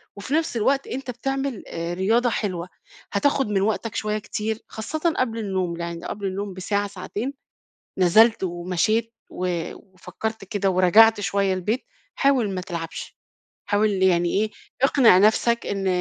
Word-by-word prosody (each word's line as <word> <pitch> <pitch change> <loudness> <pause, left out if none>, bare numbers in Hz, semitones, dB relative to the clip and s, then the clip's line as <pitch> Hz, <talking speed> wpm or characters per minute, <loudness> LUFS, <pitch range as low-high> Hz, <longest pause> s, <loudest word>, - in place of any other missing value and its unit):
وفي 200 +7 -6
نفس 315 -6 +1
الوقت 270 +5 +1
أنت 260 0 -4
بتعمل 270 0 -3
آآ 170 +1 -4
رياضة 225 +7 +2
حلوة، 185 -6 -3 0.4
هتاخد 270 +5 +2
من 200 -2 +1
وقتَك 220 +2 -1
شوية 215 0 -1
كتير، 215 +1 -3
خاصةً 315 +10 -2
قبل 230 -3 0
النوم، 185 -5 -2
يعني 170 0 -5
قبل 200 -1 -5
النوم 195 +1 -4
بساعة 200 +2 -1
ساعتين، 200 +7 -5 0.6
نزلت 215 +5 +5
ومشيت 185 +6 0 0.2
و 175 -2 -3
وفكّرت 195 +3 -7
كده 195 -1 0
ورجعت 205 +5 +6
شوية 195 0 +1
البيت، 210 +7 -2 0.3
حاول 265 -7 +2
ما 185 - -2
تلعبش، 170 -3 -6 0.5
حاول 210 +1 +2
يعني 175 -2 +3
إيه 215 - -1 0.3
اقنع 265 -8 +6
نفسَك 225 +3 +3
إن 195 -1 -2
205 Hz, 140 wpm, -23 LUFS, 185-230 Hz, 0.6 s, ورجعت